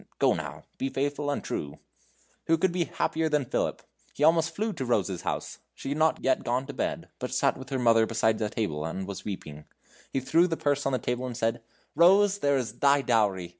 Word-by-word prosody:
Go, - - +4
now; - - -6 0.2
be 135 - -1
faithful 145 +2 -2
and 145 - -2
true!" 70 -1 -4 0.7
Who 165 - +4
could 185 +2 +2
be 175 -1 0
happier 160 0 -1
than 150 -3 +1
Philip! - - -2 0.3
He 145 - -1
almost 165 +1 +4
flew 215 +3 -1
to 135 - -4
Rose's 100 -7 0
house. - - -4 0.2
She - - -6
had 145 +2 -2
not 160 0 +2
yet 130 - +2
gone 125 +3 0
to 145 - -7
bed, - - -3
but - - -4
sat - - +2
with 130 0 -10
her 135 - -1
mother 115 -2 +4
beside 110 0 +1
a 105 - 0
table, 80 -10 -2
and 90 +4 -4
was 100 -2 -7
weeping. 75 -7 -7 0.5
He 135 - 0
threw 165 +7 +3
the 165 -2 -2
purse 145 -1 0
on - - +1
the - - +3
table 125 +2 -2
and 120 -2 -6
said: 115 -1 0 0.3
"Rose, 195 +3 +5
there 140 -4 +2
is 120 -3 -4
thy 140 0 +4
dowry! 100 -8 +1
130 Hz, 220 wpm, -28 LUFS, 110-155 Hz, 0.7 s, Rose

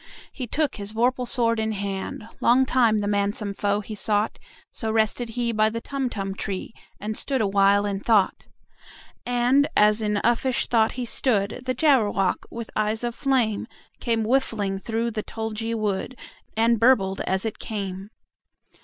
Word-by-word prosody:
He 255 -3 -6
took 300 +4 -1
his 205 0 -4
vorpal 250 +2 +1
sword 230 -2 +4
in 220 0 -1
hand: 200 +1 -4
Long 255 +2 +4
time 235 -4 +3
the 205 -1 -1
manxome 205 0 0
foe 205 +1 0
he 215 - -8
sought 210 0 0 0.3
So 220 -1 -3
rested 225 +2 0
he 240 -1 +1
by 215 -1 +3
the 230 +1 -4
Tumtum 230 -8 -3
tree, 195 +2 -4 0.3
And 215 +1 -4
stood 270 +3 -1
awhile 200 -1 +3
in 200 -1 -2
thought. 210 -2 +1 0.8
And, 245 +4 +3
as 210 +1 +5
in 210 -1 0
uffish 240 +2 +2
thought 225 -2 +2
he 250 -1 -4
stood, 225 -2 -1
The 255 0 -1
Jabberwock, 220 - +2
with 230 -1 -7
eyes 215 +2 0
of 240 0 -2
flame, 240 -6 0 0.3
Came 230 -2 0
whiffling 215 -6 0
through 230 +3 -2
the 215 -1 -3
tulgey 225 +1 -4
wood, 215 +3 -2 0.4
And 230 0 +3
burbled 205 -6 +3
as 190 +3 0
it 220 - -4
came! 195 -2 -5
220 Hz, 160 wpm, -24 LUFS, 205-240 Hz, 0.8 s, as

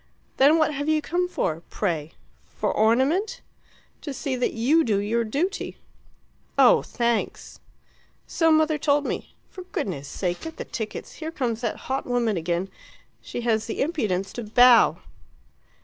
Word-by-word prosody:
"Then 290 +4 +6
what 310 -1 +2
have 285 +2 -2
you 310 0 +3
come 355 +4 -1
for, 165 - -2
pray? 165 -6 -2 0.4
For - - -2
ornament?" 265 - +2 0.6
"To 285 -3 -6
see 270 0 -2
that 250 - -1
you 280 +9 +3
do 215 -7 +1
your 220 +4 0
duty." 310 - -2 0.8
"Oh, - - +6
thanks!" 235 -1 -2 0.7
"So 325 -1 +2
mother 310 -1 +3
told 290 0 +2
me. - - -5 0.2
For 375 - -9
goodness 195 - -4
sake 175 +3 -3
get 325 0 -8
the - - -5
tickets; 220 -2 -6
here 315 - -3
comes 240 -7 -2
that 230 -3 -1
hot 265 +1 -2
woman 240 -4 +1
again! 175 +2 -2 0.5
She - - -6
has 225 -2 0
the 225 - -4
impudence 210 - -2
to 240 - -5
bow." 240 +2 +6
245 Hz, 150 wpm, -24 LUFS, 215-310 Hz, 0.8 s, Then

